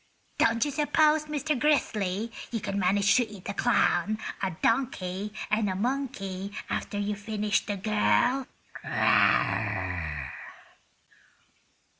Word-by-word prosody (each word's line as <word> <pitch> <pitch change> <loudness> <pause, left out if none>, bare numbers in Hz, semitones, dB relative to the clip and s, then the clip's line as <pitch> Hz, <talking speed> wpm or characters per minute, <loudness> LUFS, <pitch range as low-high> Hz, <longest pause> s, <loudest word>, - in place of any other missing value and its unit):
Don't 230 +2 +3
you 290 - -2
suppose 300 +1 +3
Mr. 300 -2 -1
Grizzly, 220 -8 +1 0.2
you 230 - -2
could 200 - -4
manage 200 +1 +3
to 245 -2 +2
eat 200 -3 -11
a - - -2
clown, 215 -3 +2 0.2
a 190 - 0
donkey 210 -5 0 0.2
and 215 -1 +2
a 185 - -2
monkey 200 -5 -3 0.2
after 205 - -3
you 205 +1 -1
finish 210 -1 -1
the 205 -1 -2
girl?" 220 +6 +2
215 Hz, 110 wpm, -28 LUFS, 200-260 Hz, 0.2 s, Don't